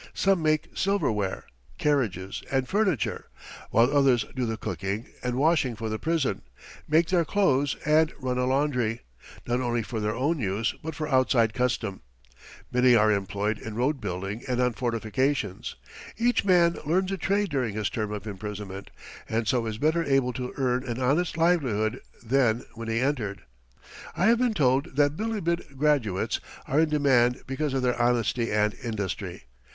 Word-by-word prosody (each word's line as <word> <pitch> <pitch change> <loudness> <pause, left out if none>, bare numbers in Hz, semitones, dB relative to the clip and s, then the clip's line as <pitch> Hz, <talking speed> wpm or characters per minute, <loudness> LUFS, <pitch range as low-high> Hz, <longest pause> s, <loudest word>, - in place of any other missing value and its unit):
Some 195 -3 +2
make 155 -1 +1
silverware, 110 - 0 0.3
carriages, 105 -11 0
and 135 -1 +1
furniture, 200 -6 0 0.4
while 120 +5 +3
others 130 -6 +4
do 125 -2 -1
the 110 0 -2
cooking 100 +2 -3 0.2
and 125 -1 -2
washing 140 -3 +2
for 110 0 -4
the 110 0 -3
prison, 155 -11 0 0.5
make 160 +2 +3
their 180 -2 +3
clothes, 145 -7 +2
and 155 +1 +4
run 125 -2 -2
a 125 - +1
laundry, 130 -4 0 0.4
not 120 +1 0
only 120 -2 0
for 115 0 -4
their 105 +1 -1
own 145 +6 0
use, 105 0 -1
but 160 -1 -5
for 155 +1 -3
outside 130 -5 +3
custom. 115 -5 -1 0.7
Many 125 0 +5
are 110 -1 +5
employed 100 +2 -1
in 110 -1 -7
road 130 +3 0
building 100 +2 -4
and 125 -1 -1
on 125 -1 +2
fortifications. 115 -1 -1 0.4
Each 240 +1 +2
man 175 -3 +4
learns 185 +5 +1
a 195 - -1
trade 200 +3 +1
during 125 -8 -1
his 105 -2 -1
term 110 -2 -2
of 105 0 -5
imprisonment, 100 -1 -6 0.4
and 110 0 -1
so 120 -3 +1
is 110 -1 -4
better 160 +6 +2
able 135 -4 +1
to 125 +1 -4
earn 125 -2 +1
an 120 -1 -4
honest 150 +7 +1
livelihood 130 -10 +1 0.2
than 120 -1 +2
when 115 0 -7
he 115 0 0
entered. 120 -7 -1 0.7
I 180 - +2
have 230 +2 +5
been 245 -3 +1
told 135 -3 +1
that 145 0 +3
Bilibid 170 -9 -2
"graduates" 135 -10 +1 0.3
are 140 - +2
in 160 -1 +3
demand 130 -5 +3
because 135 +1 -2
of 130 - 0
their 125 -1 +1
honesty 120 -1 +1
and 105 0 +2
industry. 110 -5 -4
125 Hz, 165 wpm, -26 LUFS, 110-150 Hz, 0.7 s, Many